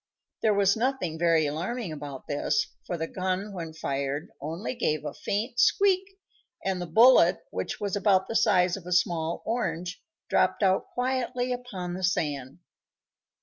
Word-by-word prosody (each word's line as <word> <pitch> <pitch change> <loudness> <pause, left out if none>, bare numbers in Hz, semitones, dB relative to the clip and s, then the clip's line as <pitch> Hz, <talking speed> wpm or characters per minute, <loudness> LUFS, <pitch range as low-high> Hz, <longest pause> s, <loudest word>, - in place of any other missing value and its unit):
There 215 -2 +3
was 200 0 +4
nothing 230 -9 -1
very 165 -2 +3
alarming 175 +8 -3
about 145 -3 -7
this, 285 - 0 0.2
for 175 - -2
the 160 - -2
gun, 190 +3 -3
when 165 -4 -5
fired, 140 -1 -3
only 165 - -4
gave 155 - -1
a - - -4
faint 220 +4 -3
squeak, 390 0 +3 0.5
and 190 -2 -1
the 175 - -4
bullet, 180 -2 +6
which 95 - -4
was 200 -1 -2
about 200 -2 +3
the 225 - -4
size 180 -5 +4
of 185 -3 -10
a 180 - -1
small 170 -2 +1
orange, 180 -6 -2 0.3
dropped - - +2
out 190 -1 +2
quietly 250 0 -1
upon 195 -8 -5
the 185 +1 -5
sand. 145 -7 -1
185 Hz, 155 wpm, -27 LUFS, 160-225 Hz, 0.5 s, bullet